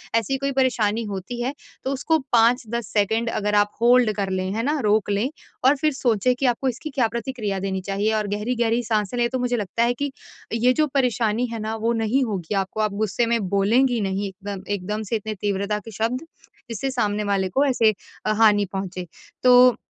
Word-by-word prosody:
ऐसी 230 +4 +1
कोई 275 +1 -1
परेशानी 230 -3 +1
होती 195 +6 -5
है 255 +3 -1 0.3
तो 265 - -1
उसको 320 +4 +1
5-10 235 -2 +2
सेकंड 220 +2 0
अगर 210 -2 -1
आप 205 0 +3
होल्ड 240 -1 +5
कर 200 -2 -1
लें, 185 0 -2
है 225 +2 -1
ना? 295 +3 0
रोक 210 -1 +2
लें 205 +5 +1 0.4
और 270 +2 +6
फिर 305 +2 +1
सोचें 250 -2 +2
कि 270 - -2
आपको 265 +3 -3
इसकी 260 +6 -5
क्या 250 -5 +3
प्रतिक्रिया 230 -3 -3
देनी 190 0 -2
चाहिए 200 +3 -1
और 215 -1 0
गहरी-गहरी 230 +3 0
साँसे 215 0 -1
लें 240 0 +2
तो 260 - -2
मुझे 245 -1 0
लगता 210 +2 -1
है 240 +1 +2
कि 285 +3 -3 0.4
ये 240 +2 +3
जो 305 +3 +2
परेशानी 240 -3 +1
है 225 - -4
ना 220 +1 -3
वो 225 +1 0
नहीं 230 +4 +1
होगी 200 -3 -3
आपको, 195 +2 -1
आप 215 -1 0
गुस्से 215 +3 0
में 230 0 +1
बोलेंगी 230 +6 +3
नहीं 195 0 -1
इतना 200 +1 -7 0.2
एकदम 210 +3 -3
से - - +1
इतने 215 0 -3
तीव्रता 205 +1 -1
के 225 - -8
शब्द, 225 +5 -1 0.5
जिससे 235 +4 -3
सामने 210 -4 0
वाले 190 -1 0
को 275 +9 +2
ऐसे 235 -5 +3 0.3
अ, 215 - +2
हानि 210 -2 +4
पहुँचे। 185 -2 -4 0.4
तो 250 -1 +7
225 Hz, 200 wpm, -23 LUFS, 205-245 Hz, 0.5 s, तो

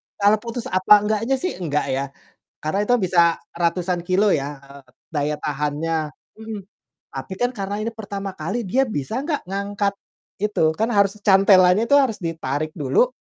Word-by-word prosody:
tali 205 +1 +4
putus 235 +1 -5
apa 200 +3 +5
enggaknya 220 +5 0
sih? 355 - -4
Enggak 150 -4 -1
ya. 135 +1 -1 0.5
Karena, 190 +7 0
itu 245 - +2
bisa 170 -3 +3 0.2
ratusan 175 +1 0
kilo 190 +3 +2
ya, 140 -1 -4
eee, 140 +1 -14 0.3
daya 150 +1 0
tahannya, 150 +2 -2 0.2
mhm. 220 -1 -7 0.5
Tapi 135 +7 -5
kan, 245 - +2
karena 200 -1 -3
ini 225 - -1
pertama 200 -3 -6
kali, 240 - -2
dia 260 +8 +2
bisa 215 - -3
enggak 300 -2 -2
ngangkat, 200 +1 -1 0.4
gitu? 185 -6 +1
Kan, 225 +2 0
harus 200 0 +3
cantelannya 195 +1 +5
itu 285 - +6
harus 260 -7 +2
ditarik 155 -3 -2
dulu 145 - +3
195 Hz, 160 wpm, -22 LUFS, 155-215 Hz, 0.5 s, itu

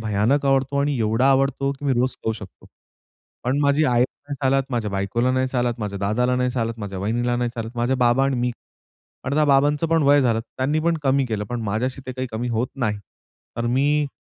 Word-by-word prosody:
भयानक 110 +7 +1
आवडतो 135 +1 +2
आणि 145 0 0
एवढा 115 +4 +2
आवडतो, 135 0 +1
की 140 +1 -11
मी 140 - +2
रोज 125 +1 +1
खाऊ 110 - +1
शकतो. 105 -4 -11 0.8
पण 130 +3 +1
माझी 140 +2 +3
आईला 125 0 +1
नाही 145 - -3
चालत, 135 0 +3
माझ्या 115 -4 -1
बायकोला 100 +6 0
नाही 130 0 +1
चालत, 120 -2 0
माझ्या 100 -2 -4
दादाला 120 +6 +1
नाही 125 0 +1
चालत, 115 -2 -2
माझ्या 100 -3 -5
वहिनीला 120 +5 0
नाही 120 0 -1
चालत, 115 -1 -5
माझे 120 +2 +1
बाबा 125 +1 +3
आणि 135 -1 0
मी 125 0 0 0.7
अर्थात 150 +3 +1
बाबांचं 145 +3 +3
पण 165 -1 +3
वय 145 +1 +5
झालं 115 -4 +2
त्यांनी 135 +6 -2
पण 170 +1 +1
कमी 135 -1 +2
केलं. 110 -3 -2
पण 120 +3 -4
माझ्याशी 120 +6 -2
ते 130 - -4
काही 130 +1 -4
कमी 115 +3 -2
होत 115 +1 0
नाही. 110 -6 -1 0.6
तर 120 0 -1
मी 145 +4 +2
125 Hz, 205 wpm, -22 LUFS, 115-135 Hz, 0.8 s, वय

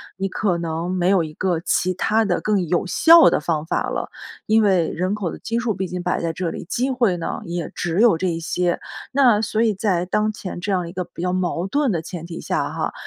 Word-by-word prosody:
你 195 +1 -2
可 190 -3 0
能 165 0 -3
没 180 -1 +1
有 190 -4 +3
一 155 - -9
个 175 0 -1
其 185 +2 0
它 220 +4 +1
的 190 -5 0
更 205 -4 0
有 175 +1 +1
效 335 - +7
的 - - 0
方 155 -1 -1
法 - - -1
了。 - - -3 0.4
因 220 +1 +4
为 185 -5 +3
人 185 +4 -2
口 205 -4 -2
的 - - -7
基 230 +1 -2
数 235 -2 -1
毕 190 -1 -3
竟 180 0 -4
摆 180 0 -1
在 165 -1 -1
这 170 +1 -3
里， - - -6
机 255 +3 0
会 240 -8 +1
呢， 170 - -4
也 170 -2 -4
只 175 +2 -1
有 225 -7 +5
这 185 - -1
一 165 -2 -1
些。 175 +1 -1 0.3
那 255 -6 +4
所 220 0 -1
以 225 -2 +3
在 185 -3 0
当 210 +3 0
前 195 -3 -7
这 205 - -2
样 180 -3 0
一 - - -7
个 180 0 -3
比 - - -17
较 180 0 0
矛 180 -1 -1
盾 285 +3 +1
的 170 -4 -1
前 170 0 -7
提 170 -1 -7
下 - - -1
哈， - - -3
185 Hz, 265 characters per minute, -21 LUFS, 170-215 Hz, 0.4 s, 效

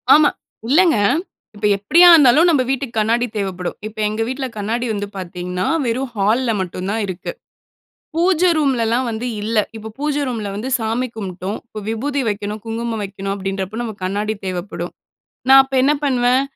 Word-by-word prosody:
ஆமா. 300 -1 +5 0.4
இல்லங்க, 325 -1 +5 0.6
இப்ப 205 +1 -4
எப்படியா 330 - +6
இருந்தாலும் 300 +1 +6
நம்ம 300 -6 +3
வீட்டுக்கு 270 -3 -2
கண்ணாடி 230 +3 +2
தேவைப்படும். 185 -3 -3
இப்ப 215 - -12
எங்க 215 +1 -3
வீட்ல 260 +2 -3
கண்ணாடி 225 +4 -2
வந்து 205 0 -3
பாத்தீங்கன்னா, 180 0 -4 0.2
வெறும் 250 +3 -1
ஹால்‌ல 225 +5 +2
மட்டுந்தான் 190 +4 -3
இருக்கு. 185 - -5 0.8
பூஜை 355 +1 +3
ரூம்லலாம் 255 -4 +1
வந்து 230 +2 -3
இல்ல. 220 +2 -1 0.2
இப்ப 220 0 -8
பூஜை 295 0 0
ரூம்ல 225 -5 -3
வந்து 225 +6 -4
சாமி 225 +3 -1
கும்பிட்டோம். 190 -1 -5
இப்ப 215 - -8
விபூதி 275 +6 -1
வைக்கணும், 210 +1 -4
குங்குமம் 225 0 -3
வைக்கணும் 195 0 -5
அப்பிடின்றப்போ 195 +2 -4
நமக்கு 215 -5 -7
கண்ணாடி 205 +3 -1
தேவைப்படும். 185 +2 -4 0.6
நான் 270 0 +9
அப்ப 270 0 -8
என்ன 280 +3 +4
பண்ணுவேன்? 255 -1 +3
225 Hz, 150 wpm, -19 LUFS, 200-260 Hz, 0.8 s, நான்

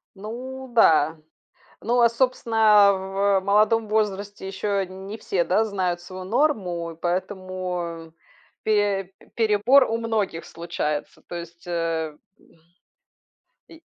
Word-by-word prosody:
Ну 255 +6 -7
да. 160 -7 +4 0.6
Ну 240 +2 +2
а, 235 - +6
собственно, 225 -4 +4
в 195 +1 +1
молодом 215 +3 +3
возрасте 205 -2 -2
еще 195 0 -1
не 190 +3 -8
все, 190 -5 -1
да, 185 +6 +2
знают 185 -4 -2
свою 185 +1 -8
норму, 190 - 0
и - - -12
поэтому 180 -2 -4 0.5
пе 205 -3 +1 0.2
перебор 230 +5 +4
у 225 - 0
многих 215 -7 -2
случается, 165 -3 -4
то - - -7
есть, 170 0 -9
э, 165 -3 -2 0.2
м 165 - -25 1.1
И 325 - -15
195 Hz, 115 wpm, -24 LUFS, 175-220 Hz, 1.1 s, а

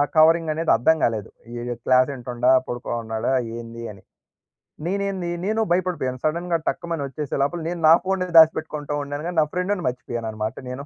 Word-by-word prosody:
ఆ - - +6
కవరింగనేది 160 0 +4
అర్థం 140 +8 +3
కాలేదు. 110 -4 -1 0.2
ఈయ్ 120 +1 -4
క్లాసింటుండా? 125 -1 +2 0.2
పడుకోనున్నాడా? 120 -1 -3 0.2
ఏందీ 115 0 -8
అని. 95 - -17 0.8
నేనేంది, 195 -1 -2 0.2
నేనూ 220 +2 +1
భయపడిపోయాను 175 -8 0
సడెన్‌గా 170 +2 0
టక్కుమని 170 -4 -3
వచ్చేసే 145 +1 -5
లోపల 170 +4 -1
నేను 175 -1 -4
నా 160 - +10
ఫోన్‌నే 185 -1 -1
దాసిపెట్టుకుంటూ 155 -2 +2
ఉండాను 145 +2 -5
గానీ, 175 -2 -5
నా - - +3
ఫ్రెండ్‌ని 180 +1 -1
మర్చిపోయాననమాట 115 -3 -4
నేను. 135 +3 -6
150 Hz, 145 wpm, -23 LUFS, 120-170 Hz, 0.8 s, నా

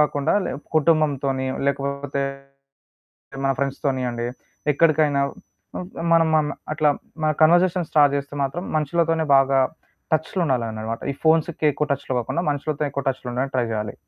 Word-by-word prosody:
కాకుండా 150 0 +2
లే - - -2 0.2
కుటుంబంతోని, 145 -4 +2 0.2
లేకపోతే 140 0 -1 1.2
మా 135 - +3
ఫ్రెండ్స్‌తోని 135 -1 -1
అండి. 120 0 -3 0.5
ఎక్కడికైనా 150 -2 +3 0.5
హ్మ్ 180 - -5 0.2
మనం 165 -1 +5
మన 155 -1 +3 0.3
అట్లా 155 -1 +3 0.3
మన 155 - +3
కన్వర్జేషన్ 175 +1 +4
స్టార్ట్ 145 -2 +4
చేస్తే 140 +1 -5
మాత్రం 140 +6 -2
మనుషులతోనే 165 +2 +1
బాగా 135 0 +4 0.5
టచ్చులో 160 +4 0
ఉండాలన్ననమాట. 115 -4 -2
ఈ - - -9
ఫోన్స్‌కి 160 0 +2
ఎక్కువ 150 +2 -1
టచ్చులో 135 -1 -3
కాకుండా, 145 +8 -2
మనుషులతో 145 +1 -2
ఎక్కువ 140 -1 -4
టచ్చులో 130 -1 -3
ఉండడానికి 135 +2 -2
ట్రై 120 -2 +1
చేయాలి. 105 -1 -3
145 Hz, 135 wpm, -23 LUFS, 135-155 Hz, 1.2 s, మనం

